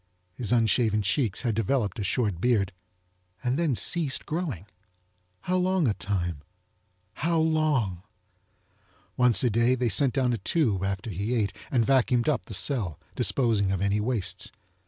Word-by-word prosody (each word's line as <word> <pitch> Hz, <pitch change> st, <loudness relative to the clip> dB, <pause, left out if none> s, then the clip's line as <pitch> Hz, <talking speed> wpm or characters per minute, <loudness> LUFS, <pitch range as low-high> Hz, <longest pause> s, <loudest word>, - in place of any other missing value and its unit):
His 110 Hz, +1 st, -2 dB
unshaven 110 Hz, -2 st, +2 dB
checks 105 Hz, -1 st, 0 dB
had 120 Hz, -3 st, 0 dB
developed 115 Hz, +1 st, -1 dB
a -, -, -2 dB
short 100 Hz, -2 st, -1 dB
beard 110 Hz, -6 st, +1 dB, 0.7 s
and 130 Hz, +4 st, 0 dB
then 160 Hz, -7 st, +1 dB
ceased 155 Hz, +1 st, +2 dB
growing. 150 Hz, -, -4 dB, 0.8 s
How 185 Hz, 0 st, -1 dB
long 185 Hz, -3 st, +1 dB
a 110 Hz, -, +2 dB
time? 90 Hz, -7 st, -3 dB, 0.7 s
How 165 Hz, +1 st, -1 dB
long? 155 Hz, -, +1 dB, 1.1 s
Once 125 Hz, -1 st, +4 dB
a 125 Hz, -, +2 dB
day 120 Hz, +4 st, +2 dB
they 125 Hz, -2 st, 0 dB
sent 125 Hz, +7 st, +1 dB
down 130 Hz, -3 st, +1 dB
a 115 Hz, -, -2 dB
tube 105 Hz, -, 0 dB
after 100 Hz, +3 st, -3 dB
he 100 Hz, +7 st, -2 dB
ate 100 Hz, -4 st, 0 dB, 0.2 s
and 120 Hz, -4 st, +1 dB
vacuumed 125 Hz, -2 st, +2 dB
up 150 Hz, -4 st, 0 dB
the 110 Hz, -, -5 dB
cell, 95 Hz, -, -1 dB
disposing 110 Hz, -7 st, +1 dB
of 95 Hz, -, -1 dB
any 100 Hz, +2 st, 0 dB
wastes. 110 Hz, -3 st, -1 dB
115 Hz, 155 wpm, -26 LUFS, 100-135 Hz, 1.1 s, Once